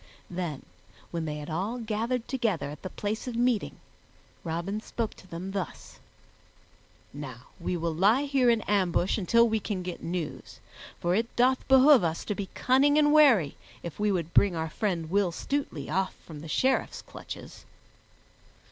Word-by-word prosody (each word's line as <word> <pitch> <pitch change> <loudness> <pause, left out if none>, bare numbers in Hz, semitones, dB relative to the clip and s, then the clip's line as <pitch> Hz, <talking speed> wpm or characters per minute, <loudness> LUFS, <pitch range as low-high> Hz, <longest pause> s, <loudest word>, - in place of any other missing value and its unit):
Then, 170 -6 -4 0.5
when 165 -2 -2
they 150 -1 -3
had 150 +1 -6
all 195 +9 -2
gathered 230 +2 -2
together 220 - -1
at 150 - -10
the 185 - -5
place 210 +6 -4
of 245 - -4
meeting, 240 -2 0 0.6
Robin 170 +6 -3
spoke 225 0 -3
to 185 - -17
them 180 +2 -6
thus: 195 -5 -6 1.1
"Now 130 -4 -8
we 180 - -2
will 165 -1 -1
lie 205 - +4
here 275 -3 +3
in 230 -2 +3
ambush 190 -1 +1
until 230 +5 +4
we 220 -1 +1
can 200 -3 -3
get 180 -1 -6
news, 170 -2 -5 0.4
for 175 +1 +1
it 225 +4 -1
doth 255 +2 +2
behoove 265 -3 +7
us 165 -1 -1
to 210 - -1
be 200 -2 -5
cunning 275 +3 +4
and 295 -1 +5
wary 245 - +5 0.3
if 170 +1 -7
we 210 0 +2
would 170 -4 -2
bring 200 -3 +4
our 160 -1 -3
friend 170 -6 -2
Will 200 -2 +2
Stutely 220 - -3
off 185 +4 -1
from 155 -3 -9
the 160 - -9
Sheriff's 260 +11 0
clutches." - - -10
195 Hz, 165 wpm, -28 LUFS, 170-235 Hz, 1.1 s, behoove